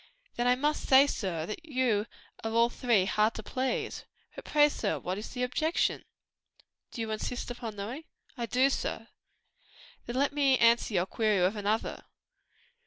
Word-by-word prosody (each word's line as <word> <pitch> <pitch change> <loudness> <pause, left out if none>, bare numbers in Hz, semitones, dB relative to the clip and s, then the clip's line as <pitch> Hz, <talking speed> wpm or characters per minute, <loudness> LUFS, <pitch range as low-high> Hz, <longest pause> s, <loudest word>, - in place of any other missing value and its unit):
"Then 240 - 0
I 250 - +5
must 295 +4 -1
say, 270 +1 +8
sir, 185 - -3
that 215 - -6
you 255 -8 0 0.4
are 225 - -1
all 230 +1 +4
three 235 -6 +2
hard 215 +3 +1
to 220 - -6
please. 260 +4 -2 0.3
But - - -10
pray, 295 -1 +5
sir, 220 -8 -2
what 185 +2 -4
is 215 - -7
the 250 -1 -3
objection?" 310 +6 0 0.8
"Do 235 - -6
you 220 -1 -3
insist 240 +3 -4
upon 235 -3 -6
knowing?" 235 +10 -6 0.3
"I 240 -3 -4
do, 260 +4 +3
sir." - - -3 1.0
"Then 240 - -4
let 280 +2 +1
me 275 -3 +3
answer 235 -2 +3
your 175 0 +2
query 210 -1 +1
with 185 +4 +2
another. 210 +2 -2
235 Hz, 170 wpm, -29 LUFS, 215-265 Hz, 1.0 s, say